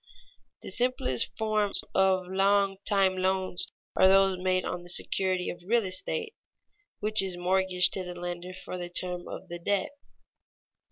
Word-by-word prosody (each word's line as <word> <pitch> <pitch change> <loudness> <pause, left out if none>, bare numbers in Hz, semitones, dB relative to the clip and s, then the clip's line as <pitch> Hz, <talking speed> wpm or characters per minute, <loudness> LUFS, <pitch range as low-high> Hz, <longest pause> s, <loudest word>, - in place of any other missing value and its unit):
_ - - -63
The - - -5
simplest 240 - 0
forms 215 -2 0
of 190 -1 +2
long 195 +1 +2
time 195 -2 +3
loans 185 -1 -1 0.3
are 190 - +6
those 195 -1 +4
made 185 0 0
on 180 - -4
the 175 - -11
security 185 +1 -1
of 175 - -11
real 225 +3 +1
estate, 425 - -1 0.7
which 215 0 +5
is 190 -2 -2
mortgaged 180 0 +3
to 190 - -1
the 180 0 -7
lender 175 +1 -6
for 180 - -6
the 175 0 -5
term 180 0 -2
of - - -8
the 175 0 -7
debt. 195 +2 -1
185 Hz, 160 wpm, -28 LUFS, 180-195 Hz, 0.7 s, are